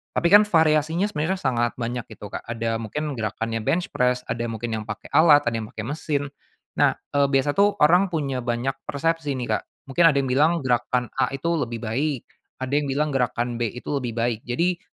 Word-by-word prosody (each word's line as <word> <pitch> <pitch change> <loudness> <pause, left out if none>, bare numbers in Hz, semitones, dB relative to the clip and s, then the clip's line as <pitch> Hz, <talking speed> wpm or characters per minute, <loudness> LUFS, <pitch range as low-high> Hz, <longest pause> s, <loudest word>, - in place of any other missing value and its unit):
tapi 170 - +2
kan 210 +1 +8
variasinya 160 0 +3
sebenernya 185 -2 -1
kan - - -10
sangat 120 0 +1
banyak 120 0 -4
itu, 110 - -13
Kak. - - -4
Ada 115 -1 -2
mungkin 145 +7 -4
gerakannya 115 +1 -2
bench 175 - -1
press, 125 0 +1
ada 120 0 -2
yang 115 - -4
mungkin 115 +1 -4
yang 105 - -7
pakai 105 - -7
alat, 145 -1 +6
ada 120 - 0
yang 110 - -6
pakai 110 - -6
mesin. 145 -1 -2 0.6
Nah, - - +4 0.2
eee, 140 0 +4
biasa 135 +1 +2
tuh 205 +1 +4
orang 180 +6 +5
punya 140 -5 -1
banyak 120 +2 -1 0.2
persepsi 155 -1 -1
nih, 120 - 0
Kak. - - -17 0.3
Mungkin 170 +6 +3
ada 155 - +3
yang 135 - -1
bilang 150 +5 +4
gerakan 125 0 0
A - - +2
itu 135 +5 -4
lebih 120 -7 -3
baik, 130 +4 -1 0.4
ada 130 - -4
yang 145 -1 +1
bilang 150 +3 0
gerakan 120 -2 -1
B 120 - +1
itu 125 - -10
lebih 120 -3 -4
baik. 115 -1 0
Jadi, 170 +8 0
135 Hz, 210 wpm, -24 LUFS, 120-155 Hz, 0.6 s, kan